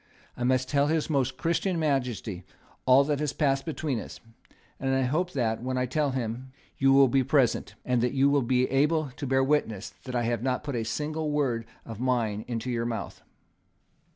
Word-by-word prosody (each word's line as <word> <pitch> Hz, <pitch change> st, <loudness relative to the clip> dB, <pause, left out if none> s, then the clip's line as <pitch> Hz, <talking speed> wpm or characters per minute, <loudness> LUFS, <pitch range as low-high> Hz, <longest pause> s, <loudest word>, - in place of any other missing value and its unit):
I 125 Hz, -, -4 dB
must 130 Hz, +1 st, +2 dB
tell 140 Hz, 0 st, +2 dB
His 160 Hz, +1 st, 0 dB
Most 135 Hz, -3 st, 0 dB
Christian 170 Hz, +2 st, 0 dB
Majesty 125 Hz, -, -1 dB, 0.4 s
all 130 Hz, +2 st, +7 dB
that 145 Hz, 0 st, -1 dB
passed 135 Hz, -3 st, +1 dB
between 150 Hz, -5 st, -2 dB
us; -, -, -9 dB, 0.6 s
and 135 Hz, 0 st, 0 dB
I 135 Hz, -, +2 dB
hope 165 Hz, +8 st, 0 dB
that, 115 Hz, -5 st, 0 dB
when 130 Hz, +1 st, -2 dB
I 125 Hz, -, +1 dB
tell 145 Hz, +3 st, 0 dB
him, 130 Hz, 0 st, -4 dB, 0.3 s
you 135 Hz, 0 st, +4 dB
will 135 Hz, 0 st, +7 dB
be 135 Hz, +1 st, +2 dB
present, 135 Hz, -2 st, +1 dB
and 125 Hz, -2 st, +1 dB
that 125 Hz, +2 st, 0 dB
you 135 Hz, 0 st, +4 dB
will 140 Hz, 0 st, +3 dB
be 125 Hz, +1 st, +2 dB
able 150 Hz, +1 st, +2 dB
to 140 Hz, +2 st, -6 dB
bear 135 Hz, +1 st, +3 dB
witness 130 Hz, -8 st, 0 dB
that 125 Hz, -1 st, -5 dB
I 120 Hz, -, +1 dB
have 115 Hz, -1 st, -1 dB
not 130 Hz, +1 st, -1 dB
put 140 Hz, -3 st, -4 dB
a 115 Hz, -1 st, -1 dB
single 150 Hz, +6 st, -2 dB
word 130 Hz, -6 st, 0 dB, 0.2 s
of 115 Hz, -2 st, -8 dB
mine 115 Hz, -5 st, 0 dB
into 120 Hz, +1 st, -3 dB
your 115 Hz, -1 st, -1 dB
mouth." 115 Hz, -1 st, -5 dB
130 Hz, 195 wpm, -27 LUFS, 120-145 Hz, 0.6 s, all